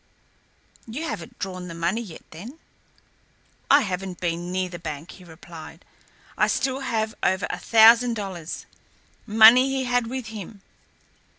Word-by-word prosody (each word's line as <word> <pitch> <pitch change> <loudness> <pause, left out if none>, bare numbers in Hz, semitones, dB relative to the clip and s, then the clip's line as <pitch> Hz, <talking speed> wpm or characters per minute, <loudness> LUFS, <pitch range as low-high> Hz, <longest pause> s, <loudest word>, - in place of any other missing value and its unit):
"You 250 +8 -5
haven't 245 -6 -6
drawn 185 -2 -6
the 165 - -8
money 170 +7 -1
yet, 190 -9 -10
then?" 220 - -10 1.1
"I 285 +1 +7
haven't 185 -4 -4
been 175 0 -3
near 185 0 -1
the 175 -1 -9
bank," 155 -1 -7
he 185 - -14
replied. 165 0 -12 0.5
"I - - +2
still 265 0 -1
have 220 -4 -2
over 190 +1 +1
a - - -5
thousand 230 +1 +6
dollars 190 -6 -6 0.6
money 225 +4 +7
he 270 -1 -1
had 245 -2 0
with 250 -2 -5
him. 205 -2 -9
205 Hz, 140 wpm, -24 LUFS, 175-240 Hz, 1.1 s, I